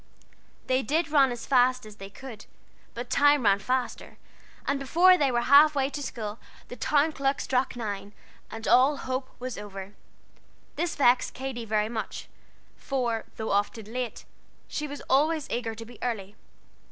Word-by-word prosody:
They 260 Hz, 0 st, +2 dB
did 300 Hz, +5 st, 0 dB
run 275 Hz, -4 st, +5 dB
as 240 Hz, -1 st, -6 dB
fast 255 Hz, -2 st, +3 dB
as 210 Hz, -1 st, -12 dB
they 195 Hz, -1 st, -9 dB
could, 230 Hz, 0 st, -11 dB, 0.5 s
but 240 Hz, +1 st, -6 dB
time 290 Hz, -1 st, +4 dB
ran 200 Hz, -2 st, +4 dB
faster, 250 Hz, +4 st, -3 dB, 0.5 s
and 280 Hz, 0 st, 0 dB
before 345 Hz, +7 st, +5 dB
they 285 Hz, -6 st, +2 dB
were 240 Hz, -1 st, +1 dB
half 290 Hz, +4 st, +6 dB
way 275 Hz, 0 st, +1 dB
to 290 Hz, -, -5 dB
school 220 Hz, -5 st, -5 dB, 0.3 s
the -, -, -7 dB
town 290 Hz, +6 st, +2 dB
clock 275 Hz, -1 st, -1 dB
struck 255 Hz, -2 st, 0 dB
nine, 205 Hz, -4 st, -5 dB, 0.4 s
and 225 Hz, 0 st, -7 dB
all 265 Hz, +4 st, +5 dB
hope 260 Hz, 0 st, -4 dB
was 250 Hz, -3 st, -5 dB
over. 200 Hz, -1 st, -8 dB, 0.8 s
This 345 Hz, -2 st, -2 dB
vexed 250 Hz, -2 st, +3 dB
Katy 255 Hz, -3 st, -5 dB
very 210 Hz, -1 st, +1 dB
much; 220 Hz, -2 st, -5 dB, 0.5 s
for, 240 Hz, -5 st, -2 dB
though 220 Hz, -, -3 dB
often 210 Hz, +2 st, -1 dB
late, 250 Hz, -3 st, -4 dB, 0.4 s
she 300 Hz, -, -4 dB
was 285 Hz, 0 st, -7 dB
always 300 Hz, +3 st, +2 dB
eager 230 Hz, -2 st, -2 dB
to 225 Hz, +1 st, -8 dB
be 235 Hz, -1 st, -14 dB
early. 210 Hz, -5 st, -3 dB
250 Hz, 165 wpm, -27 LUFS, 220-275 Hz, 0.8 s, half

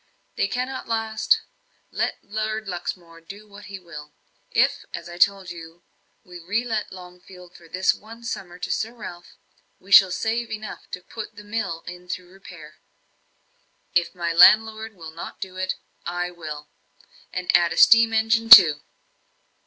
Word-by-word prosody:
They -, -, 0 dB
cannot 255 Hz, +5 st, -4 dB
last 225 Hz, -1 st, +1 dB, 0.5 s
let -, -, -2 dB
Lord 215 Hz, +1 st, -4 dB
Luxmore 175 Hz, -2 st, -7 dB
do 200 Hz, +5 st, -12 dB
what 205 Hz, 0 st, -14 dB
he 200 Hz, -, -8 dB
will. 155 Hz, -5 st, -12 dB, 0.4 s
If, -, -, +1 dB
as -, -, -8 dB
I 175 Hz, 0 st, -10 dB
told 195 Hz, -1 st, +2 dB
you, 165 Hz, 0 st, -12 dB, 0.4 s
we 180 Hz, -1 st, -12 dB
re 205 Hz, +7 st, -2 dB
let 220 Hz, -3 st, -3 dB
Longfield 180 Hz, 0 st, -14 dB
for 170 Hz, -, -16 dB
this 185 Hz, +3 st, +1 dB
one 225 Hz, +2 st, -14 dB
summer 180 Hz, -6 st, -6 dB
to -, -, -5 dB
Sir 225 Hz, +2 st, -2 dB
Ralph, 175 Hz, -6 st, -11 dB, 0.4 s
we 195 Hz, -, -18 dB
shall 190 Hz, -1 st, +8 dB
save 225 Hz, +5 st, -2 dB
enough 215 Hz, -1 st, -8 dB
to 180 Hz, -, -8 dB
put 215 Hz, +1 st, -9 dB
the 210 Hz, -, -12 dB
mill 205 Hz, -6 st, -4 dB
in 180 Hz, +1 st, -11 dB
thorough 180 Hz, -1 st, -6 dB
repair. 175 Hz, -5 st, -14 dB, 1.2 s
If 175 Hz, +1 st, 0 dB
my 170 Hz, -1 st, -2 dB
landlord 220 Hz, +4 st, +5 dB
will 165 Hz, -3 st, -10 dB
not 165 Hz, -, -9 dB
do 185 Hz, -1 st, -8 dB
it, 185 Hz, 0 st, -2 dB, 0.3 s
I 175 Hz, +1 st, -3 dB
will; 155 Hz, -4 st, -8 dB, 0.6 s
and 180 Hz, 0 st, 0 dB
add 175 Hz, -1 st, +3 dB
a -, -, -5 dB
steam 230 Hz, 0 st, +7 dB
engine, 225 Hz, +1 st, +1 dB
too." 165 Hz, -10 st, +10 dB
185 Hz, 160 wpm, -23 LUFS, 175-220 Hz, 1.2 s, too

